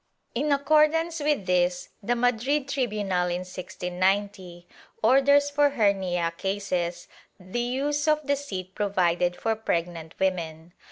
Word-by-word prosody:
^ -, -, -49 dB, 0.3 s
In 290 Hz, +5 st, 0 dB
accordance 310 Hz, +3 st, +3 dB
with 295 Hz, -8 st, 0 dB
this 180 Hz, 0 st, +1 dB
the 240 Hz, +4 st, 0 dB
Madrid 245 Hz, +4 st, +1 dB
tribunal 210 Hz, -9 st, -1 dB
in 175 Hz, 0 st, -2 dB
1690, 185 Hz, 0 st, -3 dB, 0.4 s
orders 280 Hz, +4 st, +4 dB
for 290 Hz, 0 st, +3 dB
hernia 190 Hz, -9 st, 0 dB
cases 180 Hz, -3 st, -2 dB, 0.3 s
the 185 Hz, +6 st, -5 dB
use 280 Hz, +5 st, -1 dB
of 305 Hz, -1 st, +2 dB
the 285 Hz, 0 st, +2 dB
seat 190 Hz, -10 st, -6 dB
provided 180 Hz, -3 st, +1 dB
for 225 Hz, +3 st, -1 dB
pregnant 170 Hz, -6 st, -3 dB
women. 170 Hz, -3 st, -2 dB
200 Hz, 125 wpm, -26 LUFS, 180-280 Hz, 0.4 s, orders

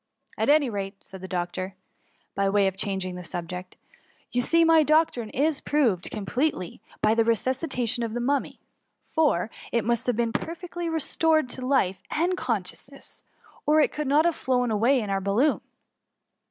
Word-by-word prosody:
<' -, -, -51 dB
At -, -, +1 dB
any 295 Hz, -1 st, +5 dB
rate/' 195 Hz, -3 st, -5 dB
said 190 Hz, -2 st, -11 dB
the 190 Hz, -, -7 dB
doctor, 185 Hz, +1 st, -3 dB, 0.6 s
by 195 Hz, 0 st, +1 dB
way 200 Hz, 0 st, +3 dB
of 190 Hz, -1 st, 0 dB
changing 190 Hz, -2 st, -2 dB
the 180 Hz, 0 st, -7 dB
subject, 180 Hz, +1 st, -6 dB, 0.3 s
'* -, -, -36 dB
you 245 Hz, -, +1 dB
see 335 Hz, +6 st, +3 dB
my 325 Hz, -1 st, +6 dB
doctrine 305 Hz, -7 st, +2 dB
is 290 Hz, +4 st, 0 dB
proved 235 Hz, -, +1 dB
completely 215 Hz, -, -2 dB, 0.2 s
by 215 Hz, -, +4 dB
the 230 Hz, -, +3 dB
resusdtation 245 Hz, +1 st, 0 dB
of 230 Hz, 0 st, -3 dB
the -, -, -1 dB
Mummy, 275 Hz, +3 st, -1 dB, 0.4 s
for 260 Hz, -, +1 dB, 0.2 s
it 235 Hz, -, 0 dB
must 235 Hz, 0 st, 0 dB
have 245 Hz, -, +2 dB
been 230 Hz, 0 st, 0 dB
perfectly 345 Hz, +2 st, -4 dB
re 325 Hz, 0 st, -1 dB
stored 315 Hz, -2 st, +2 dB
to 255 Hz, -, -4 dB
life 225 Hz, -9 st, +1 dB
and 350 Hz, +4 st, 0 dB
consciousness, 240 Hz, -, -5 dB, 0.5 s
or 305 Hz, +1 st, +5 dB
it 300 Hz, -, +3 dB
could 300 Hz, -1 st, -3 dB
not 295 Hz, +4 st, +4 dB
have 340 Hz, -2 st, +2 dB
flown 250 Hz, -2 st, 0 dB
away 235 Hz, +5 st, +3 dB
with 205 Hz, -2 st, -4 dB
our 195 Hz, 0 st, 0 dB
balloon." 210 Hz, +10 st, +2 dB
240 Hz, 180 wpm, -26 LUFS, 195-295 Hz, 0.6 s, my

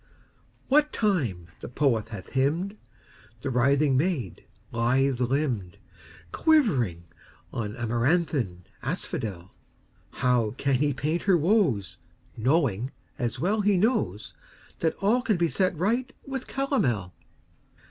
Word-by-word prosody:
What 300 Hz, +2 st, +4 dB
time 125 Hz, -, 0 dB
the -, -, -8 dB
poet 125 Hz, -4 st, +1 dB
hath 105 Hz, -5 st, -8 dB
hymned 160 Hz, +10 st, 0 dB, 0.7 s
The 135 Hz, -, -2 dB
writhing 140 Hz, +3 st, +3 dB
maid, 140 Hz, -, -1 dB, 0.3 s
lithe 125 Hz, +3 st, +1 dB
limbed, 125 Hz, -, -1 dB, 0.5 s
Quivering 135 Hz, -, +2 dB, 0.5 s
on 105 Hz, -2 st, -3 dB
amaranthine 120 Hz, -, 0 dB, 0.2 s
asphodel, 95 Hz, -4 st, -4 dB, 0.6 s
How 120 Hz, -3 st, +1 dB
can 140 Hz, -1 st, 0 dB
he 145 Hz, +2 st, +1 dB
paint 150 Hz, +6 st, -1 dB
her 185 Hz, -, +6 dB
woes, 155 Hz, -, +1 dB, 0.4 s
Knowing, 130 Hz, -, +1 dB, 0.3 s
as 120 Hz, -3 st, -2 dB
well 205 Hz, +5 st, +1 dB
he 205 Hz, -1 st, +3 dB
knows, 195 Hz, -, 0 dB, 0.5 s
That 160 Hz, -, +1 dB
all 230 Hz, +5 st, +3 dB
can 215 Hz, -6 st, +1 dB
be 170 Hz, -1 st, +2 dB
set 185 Hz, -1 st, 0 dB
right 235 Hz, -, 0 dB
with 270 Hz, -2 st, -5 dB
calomel? 125 Hz, -, 0 dB
135 Hz, 115 wpm, -27 LUFS, 115-185 Hz, 0.7 s, her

